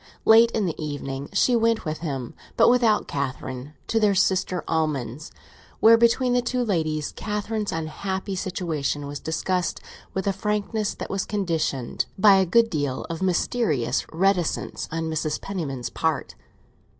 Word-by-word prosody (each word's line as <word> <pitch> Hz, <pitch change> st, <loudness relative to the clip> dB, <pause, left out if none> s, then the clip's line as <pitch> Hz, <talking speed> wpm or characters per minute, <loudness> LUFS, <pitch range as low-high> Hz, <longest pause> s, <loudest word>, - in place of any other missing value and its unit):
Late 225 Hz, +1 st, +7 dB
in 220 Hz, -3 st, -1 dB
the 165 Hz, -2 st, -3 dB
evening 140 Hz, -2 st, -5 dB
she 250 Hz, -, +3 dB
went 230 Hz, -2 st, +2 dB
with 155 Hz, 0 st, -3 dB
him, 135 Hz, -7 st, -4 dB, 0.2 s
but 230 Hz, -, +6 dB
without 235 Hz, -4 st, +3 dB
Catherine, 135 Hz, 0 st, -4 dB
to 225 Hz, -, +1 dB
their 210 Hz, -2 st, +3 dB
sister 185 Hz, -1 st, +1 dB
Almond's, 150 Hz, -4 st, -2 dB, 0.5 s
where, 225 Hz, +1 st, +8 dB
between 235 Hz, +2 st, +3 dB
the 245 Hz, -, +3 dB
two 245 Hz, 0 st, -1 dB
ladies, 155 Hz, -7 st, -1 dB
Catherine's 210 Hz, 0 st, -3 dB
unhappy 190 Hz, +5 st, -3 dB
situation 165 Hz, -6 st, -2 dB
was 145 Hz, 0 st, -6 dB
discussed 180 Hz, +3 st, -1 dB, 0.4 s
with 190 Hz, -, -1 dB
a 200 Hz, -, +1 dB
frankness 210 Hz, +1 st, -1 dB
that -, -, -6 dB
was 195 Hz, -1 st, -1 dB
conditioned 165 Hz, -, -1 dB
by 195 Hz, 0 st, +7 dB
a 190 Hz, -1 st, +2 dB
good 230 Hz, +5 st, +4 dB
deal 145 Hz, -4 st, -2 dB
of 165 Hz, -, -5 dB
mysterious 180 Hz, -, +1 dB
reticence 180 Hz, 0 st, 0 dB
on 165 Hz, +1 st, -2 dB
Mrs. 155 Hz, -1 st, -2 dB
Penniman's 145 Hz, -11 st, -4 dB
part. -, -, -1 dB
180 Hz, 150 wpm, -24 LUFS, 150-210 Hz, 0.5 s, where